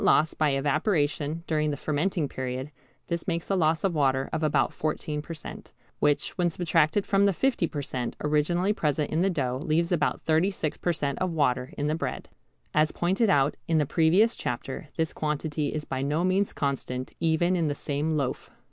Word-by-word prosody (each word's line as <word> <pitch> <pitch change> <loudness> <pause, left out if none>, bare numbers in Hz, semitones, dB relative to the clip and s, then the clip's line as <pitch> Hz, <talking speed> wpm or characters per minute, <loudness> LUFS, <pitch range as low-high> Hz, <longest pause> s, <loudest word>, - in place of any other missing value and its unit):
loss 155 0 +4
by 155 -1 +2
evaporation 150 +2 0
during 155 -2 +1
the 145 - -2
fermenting 155 +2 0
period, 130 +2 -4 0.3
this 170 -1 -3
makes 170 +1 -2
a - - +3
loss 160 -2 +2
of 195 -3 +1
water 135 -3 +2
of - - -1
about 145 -4 +2
14 150 -1 -2
per 165 +2 -7
cent., 155 - -9 0.3
which, 145 -1 +1
when 175 -1 +3
subtracted 165 +2 +2
from 200 0 +3
the - - +4
50 245 -4 +1
per 145 -2 -4
cent. 125 -3 -3
originally 170 +6 +2
present 150 -5 -1
in 160 - +1
the 195 - +3
dough, 130 -7 -1
leaves 170 +1 +1
about 155 -4 +1
36 160 0 0
per 175 - +1
cent. 145 -4 -2
of 185 - 0
water 130 -4 +1
in 145 - -1
the 150 - +1
bread. 160 - -4 0.4
As 155 0 +3
pointed 190 +6 +1
out 140 -4 +3
in 165 - +2
the 150 - +3
previous 175 - +3
chapter 130 +4 -4
this 160 -1 -1
quantity 150 0 -2
is 150 +1 -3
by 130 0 -3
no 150 +5 0
means 190 +2 +2
constant 130 -2 -3
even 165 +2 +2
in 170 -3 +1
the 145 - -1
same 150 +2 -1
loaf. 135 -3 -2
155 Hz, 190 wpm, -27 LUFS, 145-170 Hz, 0.4 s, loss